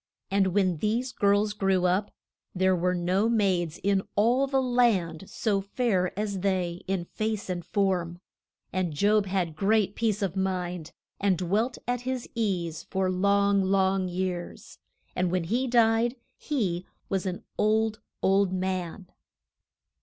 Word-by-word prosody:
And 195 Hz, -1 st, +3 dB
when 185 Hz, -2 st, +1 dB
these 230 Hz, -, -1 dB
girls 205 Hz, 0 st, +2 dB
grew 195 Hz, -3 st, +1 dB
up, 185 Hz, +3 st, +1 dB, 0.5 s
there 190 Hz, 0 st, +3 dB
were 180 Hz, +1 st, +1 dB
no 185 Hz, +5 st, +1 dB
maids 185 Hz, -7 st, +1 dB
in 200 Hz, -1 st, +2 dB
all 245 Hz, +6 st, +3 dB
the 270 Hz, 0 st, +1 dB
land 225 Hz, -10 st, +1 dB
so 205 Hz, -3 st, 0 dB
fair 200 Hz, -3 st, 0 dB
as 205 Hz, -2 st, -2 dB
they 180 Hz, -2 st, -1 dB
in 190 Hz, -2 st, -1 dB
face 215 Hz, 0 st, -3 dB
and 175 Hz, -1 st, -3 dB
form. 180 Hz, -2 st, -1 dB, 0.5 s
And 185 Hz, -4 st, -1 dB
Job 205 Hz, +4 st, +3 dB
had 180 Hz, -4 st, -1 dB
great 205 Hz, +3 st, +2 dB
peace 215 Hz, -2 st, 0 dB
of 190 Hz, -1 st, -2 dB
mind, 180 Hz, -3 st, -2 dB, 0.3 s
and 195 Hz, -2 st, +2 dB
dwelt 205 Hz, +8 st, 0 dB
at 245 Hz, 0 st, -1 dB
his 255 Hz, -1 st, -3 dB
ease 180 Hz, -8 st, -1 dB
for 190 Hz, -1 st, 0 dB
long, 200 Hz, +1 st, +3 dB
long 190 Hz, 0 st, +2 dB
years; 180 Hz, -1 st, -4 dB, 0.4 s
and 180 Hz, 0 st, +1 dB
when 180 Hz, 0 st, 0 dB
he 240 Hz, +10 st, 0 dB
died 235 Hz, 0 st, +3 dB, 0.2 s
he 185 Hz, -, -2 dB, 0.2 s
was 190 Hz, -1 st, -1 dB
an 180 Hz, -1 st, -4 dB, 0.2 s
old, 220 Hz, +1 st, +2 dB, 0.2 s
old 195 Hz, 0 st, +3 dB
man. 185 Hz, -1 st, -3 dB
195 Hz, 145 wpm, -27 LUFS, 180-215 Hz, 0.5 s, And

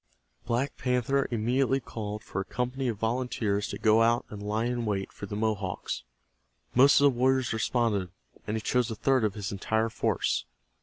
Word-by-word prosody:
Black 125 Hz, +4 st, -1 dB
Panther 130 Hz, +1 st, +1 dB
immediately 125 Hz, +4 st, +1 dB
called 105 Hz, -3 st, -6 dB
for 95 Hz, -, -3 dB
a -, -, -3 dB
company 125 Hz, +5 st, -2 dB
of 115 Hz, -4 st, -1 dB
volunteers 110 Hz, -3 st, -1 dB
to -, -, -5 dB
go 110 Hz, 0 st, +4 dB
out 115 Hz, +1 st, +3 dB
and 105 Hz, -1 st, -7 dB
lie 105 Hz, +2 st, -1 dB
in 120 Hz, 0 st, -1 dB
wait 100 Hz, -3 st, -2 dB
for 100 Hz, -, -7 dB
the 105 Hz, -, -5 dB
Mohawks. 105 Hz, -, -2 dB, 0.7 s
Most 135 Hz, +3 st, +6 dB
of -, -, +3 dB
the 135 Hz, -4 st, +4 dB
warriors 130 Hz, -1 st, +2 dB
responded, 110 Hz, -4 st, 0 dB, 0.4 s
and 110 Hz, -, -1 dB
he -, -, -3 dB
chose 125 Hz, +2 st, +1 dB
a 110 Hz, -, -3 dB
third 130 Hz, +2 st, +2 dB
of 105 Hz, -3 st, 0 dB
his 100 Hz, -2 st, -4 dB
entire 110 Hz, +3 st, 0 dB
force. -, -, 0 dB
115 Hz, 185 wpm, -28 LUFS, 105-125 Hz, 0.7 s, Most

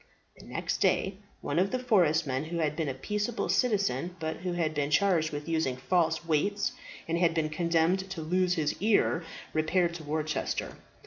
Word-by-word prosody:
The -, -, -13 dB
next -, -, -2 dB
day 190 Hz, 0 st, +1 dB, 0.2 s
one -, -, 0 dB
of 190 Hz, +2 st, +2 dB
the 255 Hz, -, -1 dB
forest 180 Hz, -11 st, +3 dB
men 135 Hz, +1 st, -2 dB
who 170 Hz, +2 st, -4 dB
had 155 Hz, -2 st, 0 dB
been 155 Hz, -3 st, -1 dB
a -, -, -2 dB
peaceable 210 Hz, -, -2 dB
citizen, 195 Hz, -, +1 dB
but 160 Hz, -1 st, -3 dB
who 180 Hz, 0 st, -3 dB
had 165 Hz, -3 st, 0 dB
been 145 Hz, -1 st, -1 dB
charged 165 Hz, -1 st, +3 dB
with 145 Hz, +1 st, -5 dB
using 160 Hz, -6 st, 0 dB
false 165 Hz, +6 st, +1 dB
weights 200 Hz, +9 st, +1 dB, 0.4 s
and 165 Hz, +1 st, 0 dB
had 170 Hz, -2 st, +3 dB
been 155 Hz, -2 st, +1 dB
condemned 170 Hz, +4 st, +1 dB
to 190 Hz, -4 st, -5 dB
lose 180 Hz, +2 st, +1 dB
his 150 Hz, -2 st, 0 dB
ears, 205 Hz, -5 st, +3 dB, 0.3 s
repaired 170 Hz, +2 st, +2 dB
to 170 Hz, -2 st, -7 dB
Worcester. 155 Hz, 0 st, -2 dB
165 Hz, 185 wpm, -29 LUFS, 155-185 Hz, 0.4 s, forest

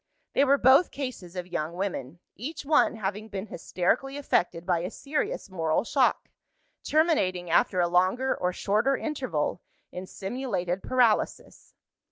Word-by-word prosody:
They 275 Hz, -, +4 dB
were 280 Hz, +1 st, +4 dB
both 270 Hz, +6 st, +6 dB
cases 245 Hz, -11 st, -6 dB
of 180 Hz, -1 st, -4 dB
young 165 Hz, -2 st, -3 dB
women; 175 Hz, -5 st, -4 dB
each 285 Hz, +6 st, -6 dB
one 295 Hz, -4 st, +3 dB
having 210 Hz, +1 st, -4 dB
been 195 Hz, -2 st, -5 dB
hysterically 220 Hz, +9 st, -1 dB
affected 175 Hz, -11 st, 0 dB
by 175 Hz, -2 st, +2 dB
a 175 Hz, +2 st, -3 dB
serious 285 Hz, +6 st, -3 dB
moral 165 Hz, -4 st, 0 dB
shock; 260 Hz, +2 st, +1 dB, 0.6 s
terminating, 185 Hz, -, +1 dB
after 180 Hz, +2 st, +3 dB
a 175 Hz, -, +3 dB
longer 185 Hz, +10 st, +2 dB
or 180 Hz, -, -1 dB
shorter 215 Hz, +9 st, +1 dB
interval, 255 Hz, -, -2 dB, 0.3 s
in 185 Hz, +1 st, -7 dB
simulated 195 Hz, -5 st, -3 dB
paralysis. 245 Hz, -4 st, 0 dB
195 Hz, 140 wpm, -27 LUFS, 180-265 Hz, 0.6 s, both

